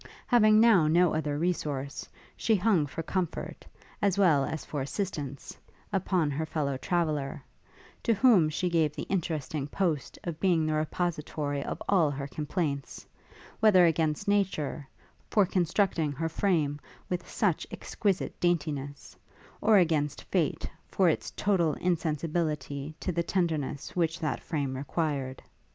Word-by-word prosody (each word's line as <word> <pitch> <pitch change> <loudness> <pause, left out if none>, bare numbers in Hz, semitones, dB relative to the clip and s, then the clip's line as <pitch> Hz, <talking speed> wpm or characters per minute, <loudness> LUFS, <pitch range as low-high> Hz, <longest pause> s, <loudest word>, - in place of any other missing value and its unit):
Having 215 -3 +5
now 215 -9 +6
no 170 +2 +4
other 150 -2 -1
resource, 145 -5 -2 0.3
she 225 - +2
hung 185 -6 +2
for 165 +4 -5
comfort, 180 0 -3 0.3
as 200 -2 +2
well 165 -8 +4
as 160 +2 -4
for 145 - -4
assistance, 140 -3 -4 0.4
upon 180 -5 +1
her 145 +3 -2
fellow 150 -3 -2
traveller, 150 -2 -1 0.6
to 230 - +2
whom 205 -9 +5
she 165 +4 -1
gave 160 -4 +1
the - - -4
interesting 155 -5 -2
post 155 -3 -1
of 165 -2 -5
being 175 -5 +2
the 155 - 0
repository 155 -2 -2
of - - -4
all 175 -7 +4
her 140 -1 -4
complaints, 150 -1 -3 0.5
whether 195 -5 +6
against 160 +2 +1
nature, 185 -8 0 0.4
for 205 -2 +4
constructing 175 -3 +1
her 165 +4 -2
frame 160 -5 0 0.3
with 180 -1 -4
such 190 -7 0
exquisite 200 -4 -2
daintiness, 145 -5 -2 0.5
or 220 -2 +5
against 155 -5 +1
fate, - - -1 0.2
for 185 -3 +3
its 155 - -1
total 175 -7 +1
insensibility 155 -3 -2
to 185 - -2
the 170 0 0
tenderness 160 -6 -2
which 165 -2 0
that 155 -7 -1
frame 140 -5 -2
required. 140 -1 -2
160 Hz, 135 wpm, -29 LUFS, 145-180 Hz, 0.6 s, now